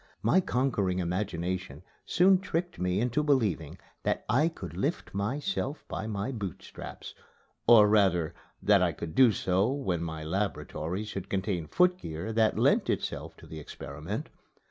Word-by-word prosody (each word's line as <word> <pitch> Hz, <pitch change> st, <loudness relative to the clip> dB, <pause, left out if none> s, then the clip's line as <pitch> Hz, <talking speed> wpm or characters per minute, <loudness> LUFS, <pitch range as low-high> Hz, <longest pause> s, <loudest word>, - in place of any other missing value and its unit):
My -, -, +5 dB
conquering 115 Hz, -, 0 dB
imagination 90 Hz, 0 st, -2 dB, 0.2 s
soon 185 Hz, +1 st, +5 dB
tricked 175 Hz, -1 st, -3 dB
me 90 Hz, +1 st, +1 dB
into 125 Hz, +5 st, +1 dB
believing 105 Hz, -, +1 dB, 0.2 s
that -, -, -1 dB
I 130 Hz, +9 st, +3 dB
could 90 Hz, -, -7 dB
lift 140 Hz, -, -2 dB
myself 140 Hz, -, -2 dB
by 110 Hz, -, -4 dB
my 105 Hz, +3 st, -2 dB
boot 100 Hz, -8 st, -5 dB
straps -, -, -9 dB, 0.5 s
or 110 Hz, -3 st, +8 dB
rather 95 Hz, -6 st, +3 dB, 0.3 s
that -, -, +5 dB
I -, -, +2 dB
could 80 Hz, -2 st, -6 dB
do 130 Hz, -3 st, +6 dB
so 95 Hz, +3 st, +1 dB
when 110 Hz, -, -1 dB
my 80 Hz, -2 st, -4 dB
laboratory 95 Hz, 0 st, -2 dB
should 100 Hz, -3 st, -6 dB
contain 95 Hz, -4 st, -1 dB
footgear 110 Hz, -, +1 dB
that 110 Hz, -1 st, +3 dB
lent -, -, +3 dB
itself -, -, -3 dB
to -, -, -14 dB
the 80 Hz, -, -8 dB
experiment. 75 Hz, -, -6 dB
100 Hz, 145 wpm, -29 LUFS, 90-130 Hz, 0.5 s, or